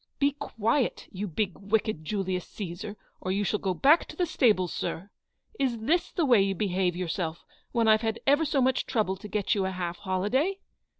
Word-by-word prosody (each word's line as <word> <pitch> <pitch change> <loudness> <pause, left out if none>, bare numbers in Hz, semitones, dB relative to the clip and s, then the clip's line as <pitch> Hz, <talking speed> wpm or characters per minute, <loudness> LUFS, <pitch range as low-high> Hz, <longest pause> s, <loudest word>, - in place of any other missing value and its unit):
" - - -52
Be 285 0 +3
quiet, 235 -2 -1
you 200 +1 -4
big, 190 +2 -1
wicked 205 -4 0
Julius 185 0 -2
Caesar, 200 +2 -6 0.2
or 185 - -3
you 200 +2 +1
shall 210 +1 0
go 190 -2 -1
back 295 - +5
to - - -10
the 360 - +1
stables, 210 - +2
sir. 195 +5 -4 0.5
Is 255 -4 +1
this 310 +11 0
the 340 - +1
way 240 -7 +6
you 195 0 +1
behave 185 -2 0
yourself 170 -2 -3 0.3
when 230 -2 +2
I've 220 0 +5
had 225 -1 -1
ever 285 +3 +4
so 280 -4 +2
much 260 0 +1
trouble 210 -5 0
to 210 - -9
get 210 0 0
you 200 -3 0
a - - 0
half 180 -2 -4
holiday 210 - 0
210 Hz, 200 wpm, -28 LUFS, 185-250 Hz, 0.5 s, way